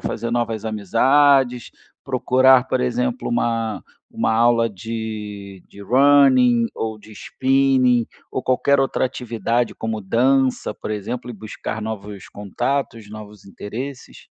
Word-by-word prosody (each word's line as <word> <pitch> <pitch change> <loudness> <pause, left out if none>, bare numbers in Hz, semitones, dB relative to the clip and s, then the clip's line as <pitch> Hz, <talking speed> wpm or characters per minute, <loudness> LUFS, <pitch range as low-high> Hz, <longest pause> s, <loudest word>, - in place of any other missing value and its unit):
fazer 115 +2 -4
novas 115 -2 -2
amizades? 125 +4 +2 0.3
Procurar, 130 0 +3
por 130 - -1
exemplo, 250 - -1
uma 115 - -1 0.3
uma - - 0
aula 115 0 +3
de 105 -2 -7
de 100 - -15
Running, 130 -1 +4
ou 110 -1 -4
de 105 +1 -15
Spinning, 130 0 +1 0.2
ou 130 - -3
qualquer 140 +2 +2
outra 135 -1 +1
atividade 120 -1 -2
como 110 -1 -4
dança, 130 +5 +1
por - - -7
exemplo, 115 +4 -5
e - - -6
buscar 110 0 -7
novos 105 -2 -7
contatos, 115 +2 -3
novos 105 -1 -11
interesses? 125 +7 -8
120 Hz, 120 wpm, -21 LUFS, 110-130 Hz, 0.3 s, Running